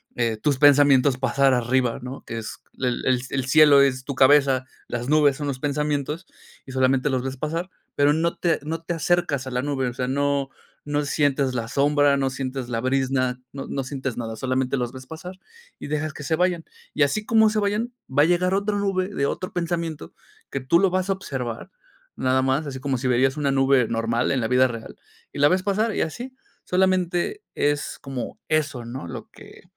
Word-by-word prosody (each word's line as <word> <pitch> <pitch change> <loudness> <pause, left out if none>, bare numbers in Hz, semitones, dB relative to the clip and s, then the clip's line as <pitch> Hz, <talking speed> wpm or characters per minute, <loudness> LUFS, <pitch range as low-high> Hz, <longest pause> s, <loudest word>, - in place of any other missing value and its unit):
eh, 115 -2 0
tus 140 +3 0
pensamientos 140 -2 +5
pasar 135 0 +2
arriba, 125 0 +1
¿no? 130 +2 -8
Que 115 - -5
es 110 - -7 0.2
e 130 - 0
el 125 +1 0
el 130 -2 -2
cielo 150 -1 +6
es 130 -2 +2
tu 140 - -3
cabeza, 135 -1 +4 0.2
las 120 +1 -3
nubes 150 -3 +4
son 145 -1 -4
los 130 -2 -3
pensamientos 150 +3 -2 0.4
y 130 - -10
solamente 130 +2 +2
los 130 -1 -1
ves 135 0 -4
pasar, 165 +6 -3 0.3
pero 145 +1 +4
no 170 +2 0
te 170 -2 +1
no 165 +2 -4
te 175 - -3
acercas 165 -5 0
a - - -5
la 125 0 -1
nube, 135 -3 -1
o - - -7
sea, 125 0 -3
no, 140 0 0 0.4
no 145 0 -1
sientes 140 -2 +1
la 115 -1 -2
sombra, 145 0 +3
no 135 -1 0
sientes 130 -1 -4
la 115 -1 -2
brizna, 130 -1 0
no 135 -1 -6
no 135 - -3
sientes 130 -3 -4
nada, 115 -2 -4
solamente 130 +2 -1
los 120 -1 -2
ves 130 0 -10
pasar 180 +4 -9 0.4
y - - -7
dejas 155 0 -2
que 150 - -9
se 160 +2 0
vayan. 175 -1 0 0.3
Y 150 - +3
así 210 +10 0
como 220 -1 +5
se 215 0 0
vayan, 210 +4 -1 0.2
va 145 +3 +4
a - - +5
llegar 180 +2 +2
otra 205 +1 0
nube 195 -2 0
de 140 -8 -1
otro 185 - -3
pensamiento 170 - -3 0.4
que 140 - -2
tú 130 +7 +3
lo 195 - +4
vas 185 +1 -1
a - - +4
observar 135 -4 -5 0.4
nada 130 0 +1
más, 135 +3 0
así 130 -2 -6
como 135 -2 -1
si 130 +1 -2
veías 130 +3 +2
una 140 -2 0
nube 135 -2 +3
normal 115 +1 0
en 130 -3 +1
la 110 - 0
vida 130 +1 +4
real, 115 -2 -8 0.3
y - - -8
la 145 - +6
ves 185 +3 +1
pasar 210 +2 0
y - - 0
así, 245 +11 -4 0.3
solamente 185 - +1
es 145 0 -1
como 135 -3 -6
eso 145 -5 0
¿no?, 120 -7 -7
lo - - -8
que - - -15
140 Hz, 210 wpm, -23 LUFS, 130-160 Hz, 0.4 s, cielo